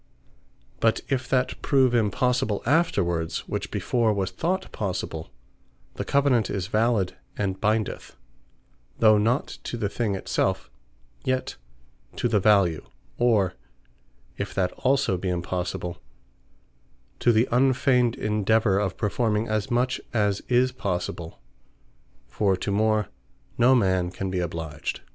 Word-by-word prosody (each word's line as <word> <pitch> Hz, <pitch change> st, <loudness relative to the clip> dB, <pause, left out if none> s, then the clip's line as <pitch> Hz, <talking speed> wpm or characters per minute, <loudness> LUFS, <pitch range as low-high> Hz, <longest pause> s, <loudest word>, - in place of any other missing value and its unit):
But 115 Hz, -1 st, +2 dB
if 130 Hz, -2 st, -1 dB
that 130 Hz, -1 st, 0 dB
prove 130 Hz, -3 st, +3 dB
impossible 120 Hz, 0 st, +1 dB
afterwards, 95 Hz, -, +1 dB
which -, -, -3 dB
before 120 Hz, -3 st, +1 dB
was 95 Hz, -2 st, -1 dB
thought 180 Hz, -, -2 dB
possible, 90 Hz, -5 st, -4 dB, 0.6 s
the -, -, -4 dB
Covenant 140 Hz, -6 st, +2 dB
is 95 Hz, -3 st, -2 dB
valid, 110 Hz, -2 st, +1 dB, 0.2 s
and 95 Hz, -2 st, -2 dB
bindeth, 110 Hz, 0 st, -1 dB, 0.8 s
(though 110 Hz, -2 st, +5 dB
not 120 Hz, +6 st, 0 dB
to 120 Hz, -, -4 dB
the 105 Hz, -3 st, -1 dB
thing 105 Hz, -2 st, -1 dB
it 95 Hz, -, -8 dB
selfe,) -, -, 0 dB, 0.5 s
yet 130 Hz, 0 st, -1 dB, 0.6 s
to -, -, 0 dB
the 110 Hz, -3 st, +2 dB
value; 95 Hz, -5 st, +3 dB, 0.4 s
or, 110 Hz, -6 st, +3 dB, 0.9 s
if -, -, -4 dB
that 90 Hz, -2 st, +1 dB
also 130 Hz, -8 st, +1 dB
be 90 Hz, +1 st, -3 dB
impossible, 90 Hz, 0 st, -3 dB, 1.2 s
to 120 Hz, -, +4 dB
the 115 Hz, +2 st, +3 dB
unfeigned 125 Hz, -1 st, +3 dB
endeavour 105 Hz, -1 st, +2 dB
of 95 Hz, -3 st, -2 dB
performing 110 Hz, 0 st, 0 dB
as 110 Hz, -1 st, -1 dB
much 125 Hz, +2 st, 0 dB
as 105 Hz, -2 st, +1 dB
is 125 Hz, +1 st, +3 dB
possible; 90 Hz, -, -4 dB, 0.9 s
for 95 Hz, -3 st, +1 dB
to 100 Hz, -, -3 dB
more 110 Hz, -1 st, +1 dB, 0.5 s
no 125 Hz, +2 st, +5 dB
man 95 Hz, -6 st, +2 dB
can 95 Hz, +1 st, -4 dB
be 95 Hz, -, -1 dB
obliged. 80 Hz, -3 st, -4 dB
105 Hz, 125 wpm, -25 LUFS, 95-120 Hz, 1.2 s, though